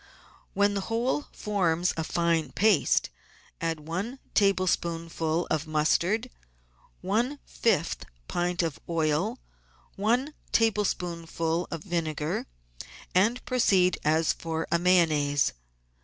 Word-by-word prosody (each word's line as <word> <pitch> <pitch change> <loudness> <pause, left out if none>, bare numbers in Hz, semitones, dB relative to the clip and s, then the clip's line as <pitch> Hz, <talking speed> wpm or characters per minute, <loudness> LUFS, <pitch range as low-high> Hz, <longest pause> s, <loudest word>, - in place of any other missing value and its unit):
When 200 0 +3
the 200 - -1
whole 240 +6 0
forms 180 -4 0
a 160 - -2
fine 170 -1 0
paste, 205 -4 +3 0.5
add 165 -2 -1
one 185 - -4 0.2
tablespoonful 170 -4 +1
of 155 0 0
mustard, 175 +10 +1 0.7
one 230 +10 0
fifth 165 -8 0 0.2
pint 175 +1 0
of 160 -4 -3
oil, 165 - 0 0.6
one 245 +9 +1 0.2
tablespoonful 175 -6 0
of 165 -2 -5
vinegar, 160 -4 -2 0.7
and 220 +7 +2
proceed 190 -8 +3
as 160 +1 +3
for 160 -1 -3
a 170 - +3
Mayonnaise. 155 -6 +3
175 Hz, 100 wpm, -27 LUFS, 160-205 Hz, 0.7 s, When